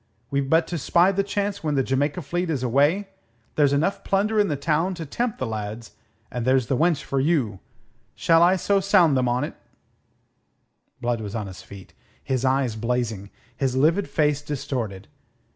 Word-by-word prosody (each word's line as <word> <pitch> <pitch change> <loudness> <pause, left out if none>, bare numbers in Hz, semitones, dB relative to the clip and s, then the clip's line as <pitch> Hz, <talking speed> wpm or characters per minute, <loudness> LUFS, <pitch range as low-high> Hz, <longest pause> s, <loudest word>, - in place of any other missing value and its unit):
We've 140 -1 -1
but 160 +1 +4
to 170 - -3
spy 175 +7 +3
the 200 0 +1
chance 200 0 -3
when 150 -2 0
the 135 - +2
Jamaica 145 +6 -1
fleet 175 +4 -2
is 140 -5 -1
away. 145 - +2 0.4
There's 145 -2 +3
enough 160 +8 0
plunder 210 +2 +1
in 205 - +4
the 150 - -1
town 160 +6 0
to 165 -2 -6
tempt 235 - -2
the 130 - -2
lads, 110 0 -5 0.4
and 125 - -3
there's 130 0 +2
the 130 - 0
wench 160 +1 +1
for 135 - -2
you. 130 - +1 0.6
Shall 165 0 +3
I 175 +2 +5
sound 190 -5 +3
them 130 -1 +1
on 125 +1 0
't?" - - -5 1.5
Blood 120 -2 -1
was 105 0 -6
on 110 -2 -3
his 95 -2 -9
feet, 100 -2 -13 0.3
his 130 -3 -1
eyes 130 -3 +1
blazing, 115 -3 -2 0.3
his 130 -2 -1
livid 165 +9 +2
face 150 -2 +1
distorted. 125 -9 -4
140 Hz, 175 wpm, -24 LUFS, 125-175 Hz, 1.5 s, I